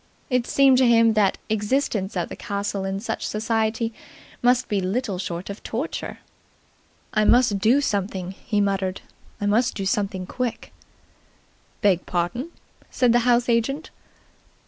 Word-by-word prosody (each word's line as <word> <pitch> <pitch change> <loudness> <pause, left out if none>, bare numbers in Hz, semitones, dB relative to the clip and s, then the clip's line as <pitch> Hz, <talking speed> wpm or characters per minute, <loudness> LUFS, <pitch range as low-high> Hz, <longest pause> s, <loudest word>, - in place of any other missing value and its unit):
It 250 -1 +1
seemed 270 -2 +5
to 260 - +5
him 230 -1 +5
that 210 -3 +2
existence 210 -2 -1
at 175 - -2
the - - -6
castle 200 -1 -3
in 195 0 -2
such 220 - -3
society 225 +1 -1 0.5
must 245 +1 +3
be 205 -2 0
little 195 0 -2
short 175 -1 -4
of 200 +1 -7
torture. 260 +9 -4 1.0
"I 215 - +3
must 235 -3 +4
do 235 +8 +4
something," 195 -6 -2
he 210 +2 -2
muttered. 195 -2 -1 0.4
"I 205 - -2
must 225 +5 +2
do 195 - -3
something 195 -1 -1
quick." 245 +3 -4 1.1
"Beg 190 -4 +2
pardon," 185 - -2 0.4
said 250 -2 +2
the 240 - +5
house 240 0 +3
agent. 245 +6 0
215 Hz, 145 wpm, -23 LUFS, 195-240 Hz, 1.1 s, seemed